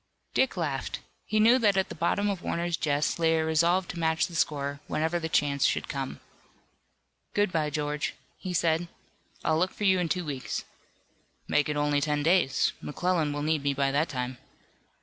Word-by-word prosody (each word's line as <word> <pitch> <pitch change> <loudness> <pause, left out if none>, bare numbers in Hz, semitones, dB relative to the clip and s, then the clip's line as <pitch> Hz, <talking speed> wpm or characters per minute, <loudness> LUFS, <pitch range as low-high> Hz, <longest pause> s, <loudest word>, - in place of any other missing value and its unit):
Dick 265 -7 +2
laughed. 145 -6 -2 0.3
He 215 - +1
knew 235 +4 +6
that 205 -4 +3
at 190 - +1
the - - -5
bottom 170 +5 0
of 195 -3 -2
Warner's 170 0 -1
jest 150 +1 0
lay 165 -1 +3
a 160 - +1
resolve 170 +3 +2
to 175 - -5
match 160 -1 +2
the 175 - -9
score, 145 -3 -1
whenever 160 +3 0
the 160 -1 -3
chance 140 -3 +1
should - - +1
come. 135 -3 -4 1.2
"Good 205 -2 +2
bye, 155 -3 0
George," 150 0 -2 0.2
he 185 - -5
said. 170 -1 +1 0.6
"I'll 160 0 +2
look 185 +2 +1
for - - -5
you 190 -2 +4
in 175 -2 -1
two 180 0 -1
weeks." 140 -4 -4 0.8
"Make 150 0 +2
it 150 - -1
only 145 -1 +2
ten 150 0 0
days. 170 -4 +3
McClellan 165 0 0
will 145 0 -3
need 155 -1 +1
me 140 0 0
by 135 0 +1
that 150 +4 +1
time." 125 -2 -4
160 Hz, 190 wpm, -28 LUFS, 145-175 Hz, 1.2 s, knew